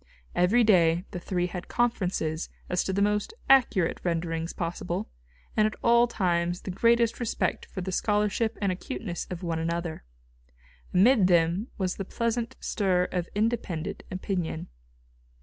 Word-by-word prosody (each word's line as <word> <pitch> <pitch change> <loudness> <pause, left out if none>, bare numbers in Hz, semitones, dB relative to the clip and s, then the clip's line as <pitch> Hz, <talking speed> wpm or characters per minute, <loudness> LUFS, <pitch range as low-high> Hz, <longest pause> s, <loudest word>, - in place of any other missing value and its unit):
Every 200 +8 +4
day 175 -4 +4
the 180 - -4
three 175 0 -1
had 180 0 -6
conferences 185 -9 -1 0.2
as 180 - +1
to - - -1
the 200 +1 +2
most 210 - 0
accurate 240 -10 +4
renderings 165 -1 -1
possible, 175 +3 -4 0.4
and 215 0 +4
at 215 - -5
all 235 +1 +5
times 175 -5 0
the 190 - -5
greatest 235 +4 +3
respect 235 -2 -1
for 185 - -6
the 190 +1 -3
scholarship 210 +3 +1
and 200 -2 +1
acuteness 180 -1 -5
of 180 0 -6
one 165 -2 -1
another. 170 0 -3 0.9
Amid 200 +1 +5
them 175 +4 +2
was 185 -2 -1
the 195 - -3
pleasant 230 +3 -2
stir 185 -4 +1
of 175 -2 -2
independent 205 -7 -1
opinion. 185 -3 -3
185 Hz, 145 wpm, -27 LUFS, 175-220 Hz, 0.9 s, all